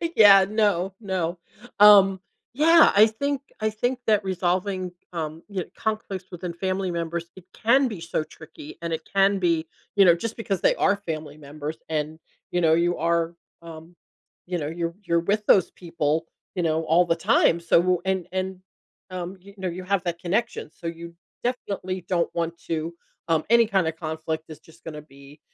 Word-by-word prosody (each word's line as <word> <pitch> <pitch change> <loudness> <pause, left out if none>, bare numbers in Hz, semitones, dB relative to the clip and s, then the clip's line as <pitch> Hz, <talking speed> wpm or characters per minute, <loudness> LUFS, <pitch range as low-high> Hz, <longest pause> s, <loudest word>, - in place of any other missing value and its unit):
Yeah, 195 -3 +8
no, 200 -3 +1
no. 185 -4 -2 0.4
Um, 200 -2 +8 0.3
yeah, 325 +4 +6
I 210 +2 +8
think 280 +5 -2 0.2
I 215 - +2
think 245 +4 -1
that 210 -2 +3
resolving, 185 0 -1 0.2
um, 160 -1 -4
you 190 -3 -3
kn - - -20
conflicts 215 -4 -3
within 175 -1 -6
family 185 +1 -2
members, 170 0 -3
it 190 - -14
can 265 +4 +3
be 210 -6 -6
so 170 -2 -2
tricky 155 -1 -12
and 170 -1 -2
it 160 - -3
can 195 0 +4
be, 170 -3 +1 0.3
you 200 -1 +6
know, 175 - +7
just 225 +6 -5
because 200 -5 -2
they - - +3
are 200 0 +2
family 155 -2 -5
members 150 +1 -7
and, 155 0 -3 0.3
you 175 - 0
know, 160 -1 +4
you 175 +2 +2
are, 170 +1 0 0.3
um, 165 +1 -11 0.5
you 180 0 -3
know, 145 - -3
you're 170 +1 -3
you're 170 -2 +1
with 205 +4 0
those 190 - +5
people, 165 -2 -2 0.3
you 180 - -1
know, 160 0 +1
all 165 +3 +3
the 165 -1 +1
time. 170 - +3
So, 175 +1 +2
and 190 -2 -1
and, 190 0 -3 0.5
um, 185 +1 -6
you 200 +1 -15
know, 190 -1 -3
you 180 +2 -6
have 195 0 0
that 170 -2 -3
connection, 180 -1 -2
so - - -16
you 170 0 -7 0.3
definitely 190 -7 -3
don't 175 -2 +1
want 170 0 -2
to, 165 +1 -2 0.4
um, 160 -1 +2
any 235 0 +6
kinda 190 -6 +1
conflict 160 0 -4
is 155 - -10
just 160 - -21
gonna 150 -2 -7
be, 140 0 -17
175 Hz, 180 wpm, -24 LUFS, 165-195 Hz, 0.5 s, Yeah